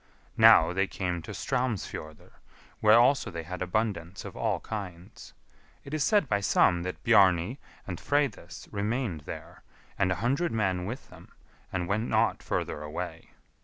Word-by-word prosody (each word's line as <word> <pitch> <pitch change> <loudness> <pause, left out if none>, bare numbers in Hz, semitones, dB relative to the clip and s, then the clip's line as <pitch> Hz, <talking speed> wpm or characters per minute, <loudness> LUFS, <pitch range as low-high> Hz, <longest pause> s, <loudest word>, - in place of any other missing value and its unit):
Now 80 +2 +7
they 95 +1 +1
came 90 -3 -3
to - - -9
Straumsfjordr, 110 - -3 0.5
where 110 +1 +6
also 130 +4 +3
they 85 -1 -6
had 90 +3 -7
abundance 90 -2 -2
of - - -8
all - - -1
kinds. 95 -5 -8 0.5
It 140 - -10
is 155 -2 +1
said 205 -4 +3
by 105 -3 +1
some 95 -3 +3
that 90 +1 -6
Bjarni 95 +5 +4 0.3
and 90 -4 -6
Freydis 145 -5 -2
remained 105 - -2
there, - - -8 0.4
and 95 -2 +2
a - - +1
hundred 140 +8 +1
men 95 -5 0
with 125 +5 -7
them, - - -15 0.4
and 90 -2 -2
went 105 +5 -1
not - - +2
further 75 - -3
away. 75 0 -6
100 Hz, 155 wpm, -28 LUFS, 90-120 Hz, 0.5 s, Now